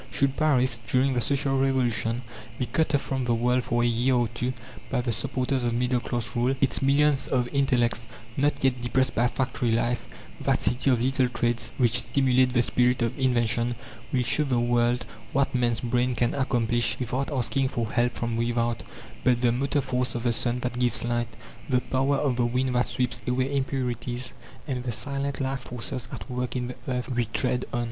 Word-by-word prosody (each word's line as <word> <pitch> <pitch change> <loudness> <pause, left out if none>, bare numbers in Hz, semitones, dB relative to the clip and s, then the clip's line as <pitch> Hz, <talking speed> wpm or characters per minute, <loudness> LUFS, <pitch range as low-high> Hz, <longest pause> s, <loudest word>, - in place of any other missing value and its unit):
Should 140 -1 +1
Paris, 130 -6 +2
during 130 +1 +2
the 120 - +1
social 135 +1 +1
revolution, 125 -3 0 0.3
be 125 - -1
cut 155 +2 +1
off 140 - +2
from 130 -2 -2
the 120 -1 +2
world 125 +2 +1
for 120 0 +1
a - - +3
year 120 +2 +2
or 120 -2 +2
two 120 +3 -2 0.4
by 125 -2 0
the 120 -1 -1
supporters 130 +1 -1
of 120 -1 0
middle 125 +1 +1
class 120 -1 -3
rule, 125 +3 +2
its 135 -1 +2
millions 140 +1 +3
of 125 -2 +1
intellects, 125 -4 +1 0.3
not 145 +1 +1
yet 130 -2 +2
depressed 125 +2 +1
by 120 +2 +3
factory 125 -1 -1
life 120 +1 0 0.4
that - - +2
City 125 +3 +2
of 125 -3 +3
little 130 -1 +2
trades 120 -1 0
which 125 -1 +3
stimulate 125 +2 +2
the 120 -1 +3
spirit 125 +1 +2
of 115 - -2
invention 120 -2 +1 0.4
will 125 -1 +1
show 125 - +2
the 130 -4 +1
world 120 +1 +1 0.3
what 140 0 +1
man's 120 -2 +1
brain 125 +1 0
can 120 +1 +1
accomplish 120 -3 +1
without 130 +4 -2
asking 135 0 0
for 115 -3 -3
help 120 0 +1
from 115 -1 -3
without, 120 0 0 0.4
but 125 -2 +3
the 120 -2 +4
motor 140 +4 0
force 125 -2 -1
of 120 - -3
the 120 - +2
sun 120 +1 0
that 125 0 -3
gives 120 -2 +2
light, 120 0 -1 0.4
the 125 -2 +3
power 135 +2 0
of 135 -3 0
the 120 - +2
wind 125 +1 0
that 125 0 +2
sweeps 125 -2 -2
away 130 +3 0
impurities, 125 -2 -2 0.3
and 125 -3 -2
the 125 - -2
silent 140 +3 -3
life 135 0 -1
forces 125 +1 -5
at - - -7
work 125 -1 -3
in 125 -1 -2
the 125 - -6
earth 125 -2 -2
we 120 -1 +1
tread 125 +3 -1
on. 120 - -1
125 Hz, 200 wpm, -26 LUFS, 120-130 Hz, 0.4 s, the